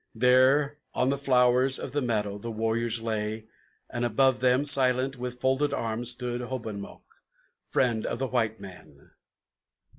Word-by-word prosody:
There 130 +5 +3 0.2
on 125 - +1
the 140 - -1
flowers 130 -1 +3
of - - -6
the 145 - -1
meadow 105 -4 -2
the 115 - -7
warriors 115 +1 -1
lay, 110 -1 -3 0.4
and 120 - -4
above 130 +3 +2
them, 130 +2 +2
Silent, 130 -1 +3
with 125 0 -6
folded 135 +3 0
arms, 115 0 -1
stood 125 0 0
Hobomok, 115 -5 -7 0.6
friend 120 -4 0
of - - -3
the 135 - -2
white 115 -4 -1
man. 95 -2 -14
125 Hz, 145 wpm, -27 LUFS, 115-130 Hz, 0.6 s, There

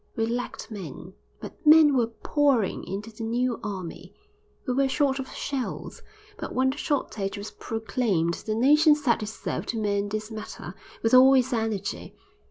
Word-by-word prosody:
We 225 - +1
lacked 240 0 -4
men, 180 -2 -8 0.3
but - - -10
men 305 -2 +7
were 240 -3 +3
pouring 255 -1 +1
into 205 +4 -5
the 220 +1 -8
new 240 +2 0
army; 190 -1 -6 0.5
we 250 - +1
were 270 +1 +2
short 275 -1 +1
of 265 - -5
shells, 270 -3 -5 0.4
but - - -6
when 260 +1 +3
the 280 - -8
shortage 210 -10 -2
was 205 +1 -7
proclaimed 215 -6 -1
the 215 - 0
nation 300 +6 +5
set 265 -6 +1
itself 215 +1 -4
to 230 - -2
mend 205 -1 0
this 215 +1 -4
matter 215 -1 -7 0.3
with 225 - +1
all 260 +1 +8
its 260 0 +2
energy. 220 -4 -3
230 Hz, 165 wpm, -26 LUFS, 210-265 Hz, 0.5 s, all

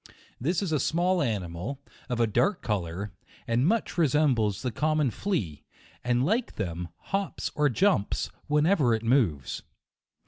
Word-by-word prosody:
This 170 +10 0
is 185 - -2
a 155 - +2
small 175 +6 +2
animal, 105 +1 -3 0.3
of 120 -1 -1
a 115 - +5
dark 175 - +1
colour, 100 -2 -2 0.4
and 120 +5 +2
much 220 -3 0
resembles 135 - +2
the 125 - -1
common 155 +2 +1
flea, 100 - -2 0.4
and 125 +1 +2
like 225 - 0
them, 90 -3 -3 0.3
hops 195 0 -1
or 150 -1 +2
jumps, 160 - +1 0.2
whenever 150 - +3
it 110 - -5
moves. 110 - +1
130 Hz, 140 wpm, -28 LUFS, 105-165 Hz, 0.4 s, a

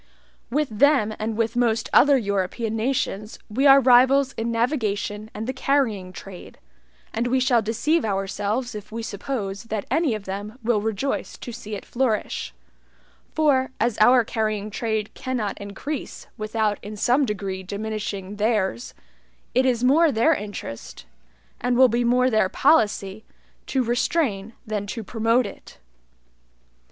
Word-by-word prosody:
With 295 +3 0
them 275 -7 +4
and 215 0 -3
with 230 +1 0
most 230 -2 +1
other 285 +1 +6
European 205 +1 -2
nations 220 -3 -2
we 265 +6 +3
are 275 0 +9
rivals 265 +1 +5
in 230 +1 -3
navigation 220 -4 -1
and 215 +2 -4
the 260 - -3
carrying 245 -9 0
trade; 185 -1 -11 0.6
and 235 +2 -1
we 260 +2 +2
shall 250 -2 +3
deceive 235 +10 0
ourselves 205 +4 -2
if 210 0 -9
we 230 +1 -5
suppose 205 -1 -4
that 215 -3 -3
any 310 -9 +2
of 215 - -7
them 205 +4 -6
will 220 -2 +2
rejoice 220 +5 -2
to 240 - -8
see 215 -2 -7
it 200 - -8
flourish; 240 -4 -1 0.8
for, 275 -4 +3
as 235 -1 0
our 245 +3 +6
carrying 215 -2 -2
trade 220 -1 -2
cannot 235 -6 -3
increase 225 +9 -6
without 215 -1 -1
in 210 +1 -7
some 250 +7 +3
degree 195 -5 -3
diminishing 205 0 -5
theirs, 205 - -1 0.6
it 260 +1 +3
is 245 -2 +1
more 305 +5 +5
their 235 +8 +3
interest, 205 - -7 0.5
and 245 0 0
will 260 0 +7
be 235 +2 +1
more 250 +2 +3
their 215 -4 +3
policy, 210 -6 +2 0.4
to 265 -2 +1
restrain 235 -3 0
than 210 -2 -3
to 225 +2 -5
promote 230 +3 +1
it. 200 - -10
225 Hz, 145 wpm, -23 LUFS, 205-255 Hz, 0.8 s, are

